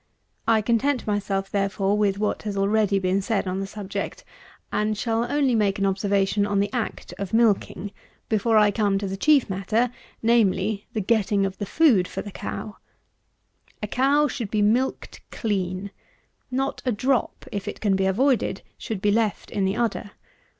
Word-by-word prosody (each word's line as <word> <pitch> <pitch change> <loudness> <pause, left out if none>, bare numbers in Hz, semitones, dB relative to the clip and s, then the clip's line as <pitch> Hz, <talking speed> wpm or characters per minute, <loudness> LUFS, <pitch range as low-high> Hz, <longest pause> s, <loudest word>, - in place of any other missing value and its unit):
I 220 -1 +4
content 245 +4 +1
myself, 195 -2 -1
therefore, 195 0 0
with 205 -2 +1
what 210 0 -1
has 205 -2 -4
already 200 0 +2
been 190 +1 +1
said 200 -1 -1
on 185 +1 -2
this 195 0 -4
subject; 205 - -5 0.5
and 210 0 0
shall 230 +2 -1
only 285 -3 +2
make 205 -3 +2
an 195 - 0
observation 195 +1 +1
on 205 -1 +1
the 200 +1 -1
act 245 -3 -4
of 200 +1 -2
milking, 210 -3 +1 0.4
before 220 +1 +2
I 210 -1 +5
come 205 -1 +1
to 200 - -3
the 190 - -3
chief 285 +6 +4
matter; 215 +5 0 0.3
namely, 215 -3 +2
the 220 - -1
getting 205 -1 +2
of 195 0 -5
the 205 - -3
food 240 - +4
for - - -5
the 205 - -8
cow. 210 +2 -6 1.1
A - - -1
cow 280 +6 +3
should 240 -8 -4
be 210 0 +1
milked 240 +6 0
clean. 195 -2 -2 0.6
Not 270 +2 -2
a 250 - +1
drop, 250 +2 0
if 200 -1 -4
it - - -5
can 200 -3 +2
be 190 0 +1
avoided, 230 -1 +1 0.2
should 210 -4 -5
be 205 - +4
left 215 -1 0
in 195 - 0
the 190 +1 0
udder. 225 -3 -2
205 Hz, 175 wpm, -24 LUFS, 195-230 Hz, 1.1 s, I